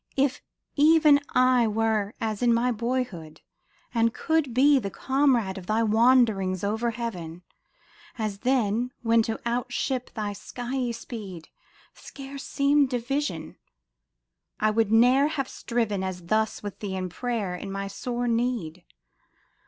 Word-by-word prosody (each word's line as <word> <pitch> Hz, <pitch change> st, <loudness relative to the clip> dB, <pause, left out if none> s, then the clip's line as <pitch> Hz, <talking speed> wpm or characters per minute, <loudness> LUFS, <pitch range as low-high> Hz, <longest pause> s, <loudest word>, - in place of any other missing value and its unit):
If 275 Hz, 0 st, +1 dB, 0.3 s
even 305 Hz, -1 st, +6 dB, 0.2 s
I 255 Hz, -2 st, +4 dB
were 215 Hz, -1 st, 0 dB
as 215 Hz, -2 st, -3 dB
in 240 Hz, -1 st, +4 dB
my 245 Hz, +2 st, +1 dB
boyhood, 230 Hz, -9 st, -3 dB, 0.5 s
and 230 Hz, -1 st, +2 dB
could 320 Hz, -5 st, 0 dB
be 275 Hz, +4 st, +5 dB
The 200 Hz, -5 st, -4 dB
comrade 250 Hz, -6 st, +1 dB
of 180 Hz, -, -13 dB
thy 220 Hz, +1 st, +1 dB
wanderings 220 Hz, -5 st, +3 dB
over 220 Hz, +4 st, 0 dB
heaven, 180 Hz, -8 st, -6 dB, 0.7 s
As 215 Hz, -3 st, -3 dB
then, 245 Hz, -1 st, 0 dB
when 230 Hz, 0 st, +4 dB
to 225 Hz, 0 st, -3 dB
outstrip 250 Hz, +1 st, -2 dB
thy 210 Hz, -2 st, -3 dB
skiey 245 Hz, +4 st, -4 dB
speed 205 Hz, -8 st, -8 dB, 0.4 s
Scarce 275 Hz, -1 st, -10 dB
seemed 280 Hz, -1 st, +2 dB
a -, -, 0 dB
vision; 265 Hz, -, -3 dB, 1.0 s
I 215 Hz, 0 st, +2 dB
would 220 Hz, -1 st, +1 dB
ne'er 250 Hz, +5 st, +5 dB
have 280 Hz, -4 st, -2 dB
striven 225 Hz, -8 st, -2 dB
As 180 Hz, -2 st, -5 dB
thus 220 Hz, +4 st, 0 dB
with 205 Hz, -1 st, -7 dB
thee 195 Hz, -3 st, -4 dB
in 185 Hz, -1 st, -3 dB
prayer 215 Hz, 0 st, -3 dB
in 195 Hz, +2 st, -6 dB
my 195 Hz, 0 st, -4 dB
sore 240 Hz, +4 st, -3 dB
need. 230 Hz, -8 st, -1 dB
230 Hz, 135 wpm, -26 LUFS, 205-255 Hz, 1.0 s, even